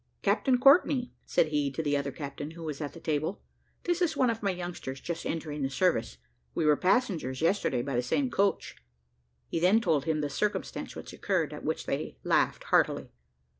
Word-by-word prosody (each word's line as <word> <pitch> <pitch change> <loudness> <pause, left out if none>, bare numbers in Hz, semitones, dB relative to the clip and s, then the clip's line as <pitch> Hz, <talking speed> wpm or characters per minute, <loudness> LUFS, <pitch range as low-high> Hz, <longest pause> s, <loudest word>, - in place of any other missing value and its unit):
"Captain 260 -2 +3
Courtney," 270 -1 +5
said 160 - +2
he 145 -2 0
to 150 +4 -3
the 145 -1 +1
other 140 0 -1
captain, 145 +1 -6
who 165 +1 -10
was 155 -2 -5
at 145 - -4
the 170 - -10
table, 155 +4 -1 0.4
"this 350 +1 0
is 320 -4 +1
one 255 -3 +4
of 225 - -5
my 200 - +1
youngsters, 175 -7 -5
just 170 +3 -4
entering 150 -2 -3
the 135 - 0
service. 135 - +1 0.4
We 160 - +1
were 150 -1 +6
passengers 180 - +1
yesterday 165 -8 +1
by 135 -1 -3
the 120 - +2
same 250 - 0
coach." 200 -2 0 0.7
He - - -2
then 185 +6 +5
told 155 - +1
him 155 -1 0
the 145 - 0
circumstance 210 +9 -2
which - - -8
occurred, - - -1
at - - -8
which - - -2
they - - -3
laughed - - +2
heartily. - - +2
160 Hz, 195 wpm, -29 LUFS, 145-205 Hz, 0.7 s, were